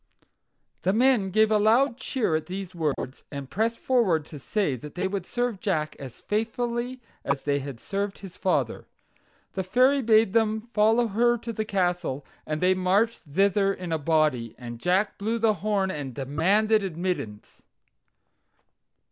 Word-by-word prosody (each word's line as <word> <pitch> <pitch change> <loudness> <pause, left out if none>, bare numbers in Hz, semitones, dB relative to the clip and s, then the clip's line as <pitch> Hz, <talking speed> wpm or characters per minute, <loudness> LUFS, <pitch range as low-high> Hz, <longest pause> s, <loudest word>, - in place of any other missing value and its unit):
The 190 - +1
men 235 -4 +3
gave 220 +3 +3
a 215 - +4
loud 235 +5 +4
cheer 255 - -1
at 155 - -2
these 190 0 -6
words, 150 -5 -3
and 140 -2 -7
pressed 225 +3 0
forward 195 - +2
to 150 -1 -10
say 170 - -1
that 145 +4 -10
they 180 - 0
would 190 -2 -4
serve 245 -4 -1
Jack 155 -8 -1
as 130 -3 -9
faithfully 235 +3 -2 0.2
as 140 0 -1
they 145 -1 +1
had 135 -3 -7
served 200 +5 -3
his 190 -3 -10
father. 185 - -1 0.7
The 190 - -1
Fairy 255 +9 +3
bade 220 -4 +4
them 220 -1 +2
follow 225 +2 +3
her 240 +4 +3
to 230 0 -6
the 215 0 -2
castle, 175 -8 -1 0.2
and 155 0 -2
they 185 +1 +4
marched 195 +5 +1
thither 195 +3 +3
in 180 -3 -6
a 160 - 0
body, 145 -7 +1
and 120 -1 -8
Jack 185 - +1
blew 220 +3 -1
the 225 -1 +3
horn 200 -2 +1
and 140 -7 -5
demanded 195 +11 +2
admittance. 175 - -4
195 Hz, 160 wpm, -26 LUFS, 155-220 Hz, 0.7 s, a